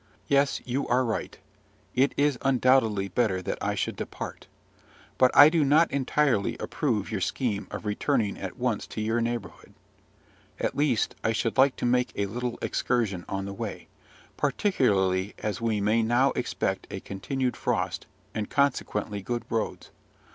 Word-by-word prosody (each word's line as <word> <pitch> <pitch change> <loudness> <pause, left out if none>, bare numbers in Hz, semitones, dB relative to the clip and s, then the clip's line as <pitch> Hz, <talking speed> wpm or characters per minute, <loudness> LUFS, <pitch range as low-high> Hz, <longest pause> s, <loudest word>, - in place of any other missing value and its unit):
Yes, 140 0 +2
you 130 +3 -2
are 125 +2 +2
right: 110 - -3 0.6
it 135 +2 +2
is 145 -3 +2
undoubtedly 130 -6 +3
better 105 -6 +1
that - - -3
I - - -1
should - - -2
depart. - - -7 0.7
But 130 - +6
I 145 - +11
do 160 -1 +3
not 155 +4 +4
entirely 135 -5 +1
approve 115 -10 -1
your 105 -3 -2
scheme 105 -1 -1
of - - -7
returning 105 +1 0
at 95 -2 -6
once 125 -3 -1
to - - -7
your 110 +2 0
neighbourhood; 120 -2 -5 0.8
at - - -1
least, 140 -5 +1
I 110 - +2
should 115 0 -1
like 135 0 +5
to - - -3
make 125 +1 +2
a 100 - 0
little 120 +4 -4
excursion 105 -8 0
on 95 0 -3
the 100 - -5
way, - - -6 0.5
particularly 100 - +1
as 105 +1 -3
we 110 -2 0
may 105 +3 +2
now 120 +4 +3
expect 95 -5 -2
a 95 - -5
continued 125 +8 -3
frost, - - -2 0.3
and 105 -1 -3
consequently 105 -7 0
good 120 +4 -3
roads. 110 -1 -3
120 Hz, 155 wpm, -27 LUFS, 105-135 Hz, 0.8 s, I